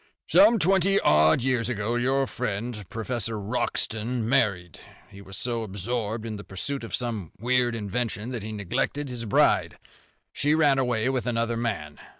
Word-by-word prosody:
"Some 290 -6 +6
twenty 195 +1 +3
odd 80 +6 +4
years 125 -2 +1
ago 110 -1 -2
your 135 +3 +1
friend, 105 -3 -4
Professor 115 -1 -3
Wroxton, 110 +1 -1
married. 100 - +1 0.3
He 100 - -12
was 95 -1 -9
so 120 -2 -2
absorbed 110 +2 -3
in 110 -2 -4
the 100 - -8
pursuit 135 +9 -5
of 115 - -2
some 110 -9 -4
weird 120 +1 +1
invention 110 +1 -3
that 120 -3 -4
he 110 +2 -6
neglected 110 +8 -2
his 120 -2 -5
bride. 105 - +2 0.6
She 150 +2 +2
ran 145 -4 +4
away 125 -2 +1
with 130 -2 -1
another 115 -1 0
man. 105 -11 -3
115 Hz, 155 wpm, -26 LUFS, 105-125 Hz, 0.6 s, Some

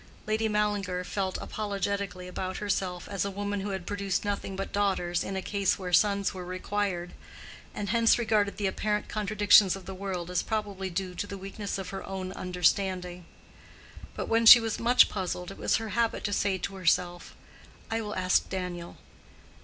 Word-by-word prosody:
Lady 220 +1 0
Mallinger 205 -4 0
felt 190 0 -2
apologetically 200 -3 -3
about 185 +1 -4
herself 190 -3 -2
as 200 - -2
a 200 - -2
woman 205 +1 -3
who 200 +1 -4
had 190 -3 -4
produced 200 -1 -2
nothing 200 -1 -3
but 195 +1 -4
daughters 190 -4 0
in 195 - -4
a 190 - -3
case 200 -2 +1
where 180 -2 -6
sons 200 +1 +3
were 185 -1 -6
required, 185 -1 -3 0.6
and 200 -1 -3
hence 230 +1 +4
regarded 215 -3 +1
the 205 - -2
apparent 210 +2 -1
contradictions 205 -2 +4
of 195 -2 -10
the 190 - -6
world 185 -2 -4
as 180 - +1
probably 205 -4 -3
due 180 +1 -3
to 190 +3 -4
the 200 - -6
weakness 195 +1 -5
of 195 - -5
her 195 - -5
own 190 -1 -4
understanding. 180 -1 -1 0.9
But - - -4
when 225 0 +3
she 240 - +13
was 225 -2 -3
much 240 +2 +6
puzzled, 180 -2 -4
it - - -11
was - - +2
her 225 -1 -2
habit 230 +2 0
to 205 - -1
say 200 -1 +1
to 195 +2 -5
herself, 175 0 0 0.6
"I 225 0 0
will 210 -1 -5
ask 185 -1 +2
Daniel." 180 -2 -5
195 Hz, 180 wpm, -28 LUFS, 185-205 Hz, 0.9 s, she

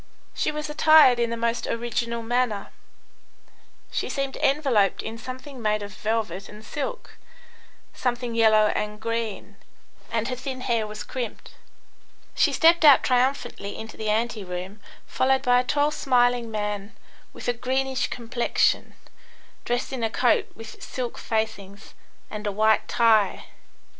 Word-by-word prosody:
She - - -1
was 300 0 -4
attired 300 -4 +6
in 235 -1 +1
the 230 - -3
most 230 0 -1
original 235 0 -2
manner; 230 -3 -1 1.2
she - - -2
seemed 275 -1 -2
enveloped 270 -9 +2
in 225 +1 -6
something 255 +2 -8
made 215 -1 0
of 205 -1 -8
velvet 210 -3 -3
and 210 +1 -12
silk, 485 +12 -6 0.7
something 245 -1 -2
yellow 215 -2 +4
and 210 0 -3
green, 230 -2 -4 0.5
and 230 -1 -1
her 255 - -2
thin 255 0 -6
hair 230 -4 0
was 210 0 -7
crimped. 245 -4 -6 0.8
She - - +3
stepped 335 +1 +4
out 290 -3 +8
triumphantly 250 -5 0
into 220 - -8
the 215 -1 -3
ante 220 0 0
room, 185 +3 -6 0.3
followed 265 +1 +1
by 245 -2 +4
a - - +1
tall, 290 +3 +1
smiling 245 -4 +2
man, 210 -1 -4 0.4
with - - -9
a 245 - +2
greenish 265 +2 -1
complexion, 240 0 0 0.7
dressed 245 +2 -2
in 250 -3 -3
a 225 - +1
coat 245 +2 +2
with 225 -1 -11
silk 250 -2 -5
facings, 215 -2 -4 0.4
and 210 0 -5
a - - 0
white 215 +2 +2
tie. 220 -5 +3
235 Hz, 145 wpm, -25 LUFS, 215-255 Hz, 1.2 s, out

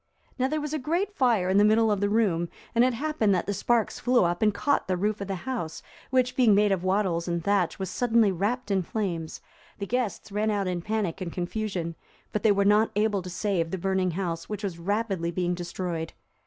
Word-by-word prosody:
Now 260 - +2
there 305 +3 -1
was 300 0 -4
a 310 - -1
great 345 +9 -1
fire 235 - +2
in 190 +2 +3
the - - +6
middle 220 +1 +4
of 205 - +1
the 205 0 +1
room, 190 -6 +1 0.2
and 235 - +4
it 255 -1 +2
happened 235 -7 +1
that 180 - -1
the 200 - -1
sparks 230 +3 0
flew 250 -2 +3
up 175 0 0
and 215 -1 +4
caught 280 +8 0
the 185 -1 0
roof 210 +2 -1
of 200 - -4
the 195 - -2
house, 170 -11 -4 0.3
which 255 -1 +1
being 235 -6 +5
made 205 0 +3
of 185 -2 0
wattles 185 -3 0
and 170 -1 -1
thatch, 200 -3 +1
was 190 - -3
suddenly 230 -4 +3
wrapped 205 +6 -2
in 195 -1 +2
flames; 175 -4 -3 0.4
the 200 - -4
guests 230 -2 -2
ran 210 +2 0
out 205 -2 0
in 180 -1 -2
panic 205 -3 -2
and 175 -2 -3
confusion, 180 -2 -3 0.4
but 210 - 0
they 220 - +4
were 200 0 +2
not 210 +2 +4
able 210 -1 +1
to 180 - -8
save 185 -2 -1
the 190 - -3
burning 190 0 0
house, 170 -2 -3
which 210 0 -5
was 180 -4 -4
rapidly 195 -2 -1
being 175 +1 -1
destroyed. 175 -2 -4
200 Hz, 225 wpm, -27 LUFS, 180-225 Hz, 0.4 s, the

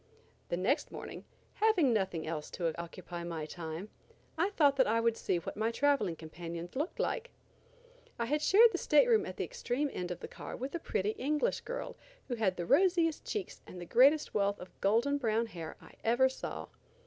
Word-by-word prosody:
The 175 - 0
next 220 - 0
morning, - - -8 0.3
having 375 - +3
nothing 190 -6 -1
else 155 -2 -4
to 165 -3 -1
occupy 170 0 -7
my 165 -3 -4
time, 165 +4 -6 0.5
I 340 +5 +1
thought 290 -8 +4
that 260 - +4
I 225 +2 +2
would 230 0 +2
see 180 - 0
what 170 - -5
my 220 +2 0
traveling 235 -8 +2
companions 170 +2 -7
looked 300 +6 -2
like. 480 0 -1 0.9
I 235 - -1
had 295 +5 0
shared 445 +8 +7
the - - -2
stateroom 450 -5 +4
at - - -7
the - - -1
extreme 290 - -2
end 180 -1 -3
of 175 -1 -4
the - - -7
car - - -8
with 265 +3 -5
a 340 - -2
pretty 205 - -1
English 300 - 0
girl - - -5 0.3
who - - -1
had 210 -6 0
the 175 - -3
rosiest 345 - +3
cheeks 415 -4 -4
and 180 - -9
the 175 - -6
greatest 275 - +4
wealth 200 -1 +1
of 180 - -12
golden 235 +8 +2
brown 230 -2 +1
hair 165 -7 -8
I - - -16
ever 240 +3 +4
saw. 260 - -6
230 Hz, 195 wpm, -32 LUFS, 175-295 Hz, 0.9 s, shared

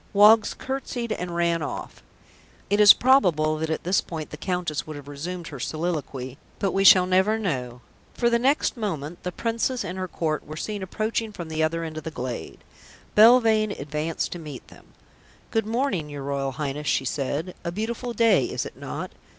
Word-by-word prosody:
Woggs 210 +2 +6
curtsied 260 -3 -4
and 180 -4 -3
ran 170 -1 +1
off. - - -6 0.7
It 205 - +3
is 210 -1 +10
probable 175 - +4
that 160 0 -2
at 160 - -2
this 185 +3 +2
point 160 -3 -7
the - - -5
Countess 175 -2 -3
would 155 - -6
have 145 -1 -10
resumed 170 +5 -6
her 140 - -8
soliloquy, 145 -5 -4 0.2
but 195 - 0
we 195 +2 +1
shall 185 -2 +8
never 190 +4 +3
know, 125 - -3 0.3
for 235 - +1
the 235 0 +3
next 275 +5 +2
moment 175 - -4
the 180 - -4
Princess 230 +5 -1
and 180 +2 -5
her 185 - -2
Court 155 -3 -2
were 155 +1 -9
seen 210 +4 -4
approaching 215 +3 -2
from 170 -5 -7
the 160 0 -2
other 165 +1 0
end 155 -1 -5
of - - -13
the 160 - -4
glade. 125 -6 -6 0.5
Belvane 220 -2 +6
advanced 150 +3 -3
to 175 - -5
meet 150 -6 -9
them. - - -17 0.6
"Good 225 -1 0
morning, 220 - -1
your 145 -1 -6
Royal 135 -1 -2
Highness," 145 +2 -4
she 135 - +1
said, 145 +6 -2
"a 170 - -3
beautiful 230 +5 -3
day, 230 -1 +4
is - - -3
it - - -8
not?" - - -6
175 Hz, 190 wpm, -25 LUFS, 150-215 Hz, 0.7 s, is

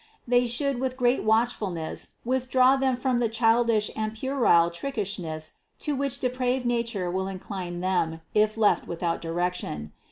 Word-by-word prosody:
They 245 0 +3
should 265 +2 -1
with 260 0 -2
great 245 0 +2
watchfulness 215 -7 -1
with 255 +1 -1
draw 255 +1 +5
them 265 -2 +1
from 250 -1 0
the 235 -2 +1
childishness 225 -1 +2
and 215 0 -3
puerile 225 -9 +3
trickish 205 0 -3
ness 155 -2 -5 0.2
to 295 - -2
which 275 -1 0
depraved 255 -1 -1
nature 230 -7 -1
will 190 +1 -1
incline 185 -2 -5
them 165 -3 0
if 215 +1 +2
left 215 -2 +3
without 170 0 -2
direction. 165 - -3
225 Hz, 155 wpm, -26 LUFS, 180-250 Hz, 0.2 s, draw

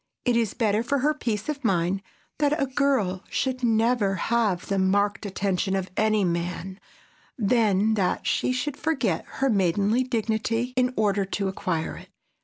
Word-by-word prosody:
It 245 -2 +2
is 230 -4 0
better 215 -2 +1
for 280 +4 0
her 295 +3 +2
peace 220 -8 -3
of 295 -2 -3
mind 190 -2 +1 0.4
that 300 +1 +2
a 275 - +2
girl 260 -9 0
should 260 -1 -1
never 225 -3 +2
have 210 -2 0
the 195 -1 0
marked 205 +2 +1
attention 195 -1 -1
of 190 -1 -3
any 215 -1 +2
man, 180 +2 -3 0.6
than 215 -2 +2
that 190 -4 0
she - - +1
should 265 +3 -2
forget 270 - 0
her 270 - 0
maidenly 200 +4 +2
dignity 230 0 -1
in 250 0 +2
order 205 -2 +2
to 195 +1 -2
acquire 175 -4 -3
it. - - -13
215 Hz, 160 wpm, -25 LUFS, 195-250 Hz, 0.6 s, It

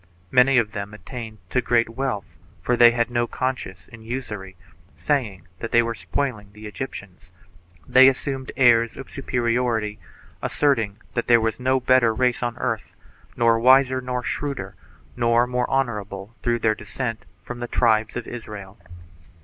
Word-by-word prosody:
Many 130 +1 +5
of 110 -3 +2
them 100 +1 -6
attained 110 +3 -8
to 125 - +2
great 115 -1 +2
wealth, 115 -4 -3 0.3
for 125 - 0
they 120 0 +8
had 120 0 0
no 120 0 +1
conscience 120 -8 -4
in 115 -1 -13
usury, 110 -5 -6 0.4
saying 95 - -2
that 115 - -5
they 120 0 +5
were 115 0 -2
spoiling 115 -4 -3
the 105 +1 -12
Egyptians. 100 -5 -8 0.6
They 130 +1 +7
assumed 135 0 -1
airs 115 -3 +4
of - - -9
superi 125 -4 -1
ority, 110 -4 -1 0.4
asserting 115 -9 +1 0.2
that 120 - -2
there 120 -1 +6
was 110 +1 -1
no 130 +1 +2
better 125 -3 +3
race 125 0 +1
on 120 -1 -2
earth, 115 -3 -3 0.4
nor 115 -1 +4
wiser, 130 +1 +5
nor 125 -1 -3
shrewder, 135 -11 -4 0.4
nor 120 0 +3
more 125 0 -1
honorable 105 -6 -2
through 120 -1 +1
their 110 -1 +2
descent 110 +2 -5 0.2
from 125 +2 -7
th£ 120 0 -5
tribes 110 -2 +2
of 120 - -4
Israel. 105 -5 -9
120 Hz, 155 wpm, -23 LUFS, 110-125 Hz, 0.6 s, they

